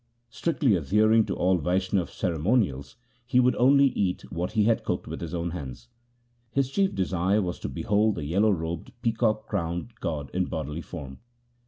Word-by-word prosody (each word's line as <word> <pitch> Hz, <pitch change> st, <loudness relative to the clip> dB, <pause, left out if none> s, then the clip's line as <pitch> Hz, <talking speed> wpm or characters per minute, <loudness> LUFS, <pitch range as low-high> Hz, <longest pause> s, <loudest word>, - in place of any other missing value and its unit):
Strictly 140 Hz, -4 st, +1 dB
adhering 110 Hz, +7 st, +3 dB
to -, -, -2 dB
all 90 Hz, 0 st, +2 dB
Vaishnav 90 Hz, +1 st, 0 dB
ceremonials, 85 Hz, -, 0 dB, 0.3 s
he 125 Hz, -1 st, +3 dB
would 125 Hz, 0 st, +4 dB
only 140 Hz, +2 st, +5 dB
eat 95 Hz, -7 st, -1 dB
what 90 Hz, +4 st, -3 dB
he 110 Hz, -2 st, +3 dB
had 115 Hz, +1 st, +2 dB
cooked -, -, -2 dB
with -, -, -7 dB
his 85 Hz, +1 st, -4 dB
own 85 Hz, 0 st, -2 dB
hands. 65 Hz, -7 st, -7 dB, 0.6 s
His 135 Hz, +1 st, 0 dB
chief 195 Hz, +4 st, +1 dB
desire 95 Hz, +2 st, +1 dB
was 90 Hz, -1 st, -4 dB
to -, -, -4 dB
behold 105 Hz, -, +1 dB
the 75 Hz, -, -4 dB
yellow 100 Hz, +8 st, +2 dB
robed, 85 Hz, -3 st, -3 dB
peacock 110 Hz, -2 st, +1 dB
crowned 85 Hz, +7 st, -3 dB
god 75 Hz, -6 st, -4 dB
in -, -, +1 dB
bodily 75 Hz, +4 st, -4 dB
form. 70 Hz, -7 st, -8 dB
95 Hz, 170 wpm, -26 LUFS, 85-110 Hz, 0.6 s, only